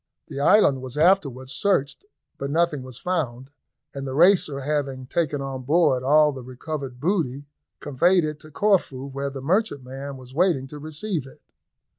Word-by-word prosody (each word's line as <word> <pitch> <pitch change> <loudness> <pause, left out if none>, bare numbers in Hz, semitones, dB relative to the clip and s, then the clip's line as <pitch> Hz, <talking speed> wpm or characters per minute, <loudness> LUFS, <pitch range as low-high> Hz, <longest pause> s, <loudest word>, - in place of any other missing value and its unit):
The - - -5
island 145 -4 +4
was 130 +2 -7
afterwards 150 -7 +2
searched, 195 - 0 0.3
but 140 - -3
nothing 160 -2 +1
was 130 -2 -9
found, 135 -8 -3 0.4
and 140 -1 -5
the 130 - -4
Racer, 165 -4 +4
having 135 -2 -2
taken 145 0 -1
on 135 -1 -5
board 145 -1 +2
all 150 +3 +4
the 135 -2 -8
recovered 130 +1 -6
booty, 145 -5 -1 0.3
conveyed 170 +5 +2
it 150 0 -5
to 155 - -13
Corfu, 155 -7 +1
where 140 0 -4
the 135 -1 -8
merchantman 140 - -2
was 130 0 -13
waiting 165 -4 +2
to 150 - -8
receive 155 0 -4
it. 135 - -16
140 Hz, 160 wpm, -24 LUFS, 130-165 Hz, 0.4 s, island